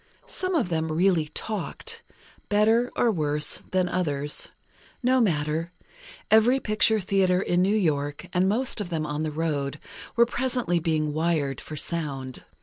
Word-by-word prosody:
Some 370 Hz, -1 st, -2 dB
of 250 Hz, -, +1 dB
them 160 Hz, -1 st, -1 dB
really 170 Hz, -1 st, +2 dB
talked—better, 220 Hz, -, -2 dB
or 235 Hz, -, +3 dB
worse, 150 Hz, -5 st, 0 dB
than 185 Hz, -1 st, +1 dB
others. 150 Hz, -5 st, -1 dB, 0.5 s
No 255 Hz, +1 st, +4 dB
matter; 160 Hz, -3 st, 0 dB, 0.6 s
every 225 Hz, +5 st, +5 dB
picture 215 Hz, -1 st, +3 dB
theatre 185 Hz, -1 st, +2 dB
in 175 Hz, 0 st, +1 dB
New 195 Hz, +3 st, +3 dB
York, 145 Hz, -4 st, -1 dB
and 185 Hz, +1 st, +3 dB
most 235 Hz, +1 st, +1 dB
of 190 Hz, -, -4 dB
them 160 Hz, -3 st, -2 dB
on 150 Hz, 0 st, -3 dB
the 155 Hz, -, -1 dB
road, 150 Hz, -2 st, -2 dB, 0.4 s
were 235 Hz, +1 st, +6 dB
presently 245 Hz, -7 st, 0 dB
being 155 Hz, -2 st, 0 dB
"wired 155 Hz, -3 st, 0 dB
for 155 Hz, -, -8 dB
sound." 140 Hz, -5 st, -4 dB
175 Hz, 145 wpm, -26 LUFS, 155-215 Hz, 0.6 s, were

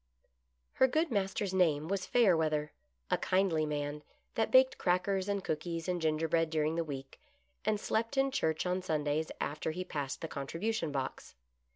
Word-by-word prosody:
Her 260 Hz, -, +5 dB
good 315 Hz, +4 st, +1 dB
master's 195 Hz, -1 st, -1 dB
name 160 Hz, -5 st, +2 dB
was 195 Hz, 0 st, -2 dB
Fayerweather; 160 Hz, -9 st, +3 dB, 0.4 s
a -, -, +3 dB
kindly 185 Hz, -5 st, +2 dB
man 145 Hz, 0 st, -3 dB, 0.3 s
that 225 Hz, -, +1 dB
baked 260 Hz, 0 st, +5 dB
crackers 190 Hz, +2 st, +1 dB
and 200 Hz, -1 st, -1 dB
cookies 165 Hz, +1 st, -3 dB
and 180 Hz, -1 st, -1 dB
gingerbread 160 Hz, +1 st, +1 dB
during 155 Hz, 0 st, +1 dB
the 165 Hz, 0 st, 0 dB
week, 135 Hz, -3 st, -8 dB, 0.4 s
and 215 Hz, -1 st, +1 dB
slept 230 Hz, +6 st, -1 dB
in 270 Hz, 0 st, +3 dB
church 160 Hz, -, 0 dB
on 180 Hz, +1 st, 0 dB
Sundays 155 Hz, -2 st, -1 dB
after 150 Hz, +2 st, -2 dB
he 180 Hz, +4 st, -3 dB
passed 145 Hz, -6 st, -4 dB
the 165 Hz, -, -3 dB
contribution 165 Hz, +5 st, -2 dB
box. 135 Hz, -, -4 dB
165 Hz, 160 wpm, -32 LUFS, 155-195 Hz, 0.4 s, Her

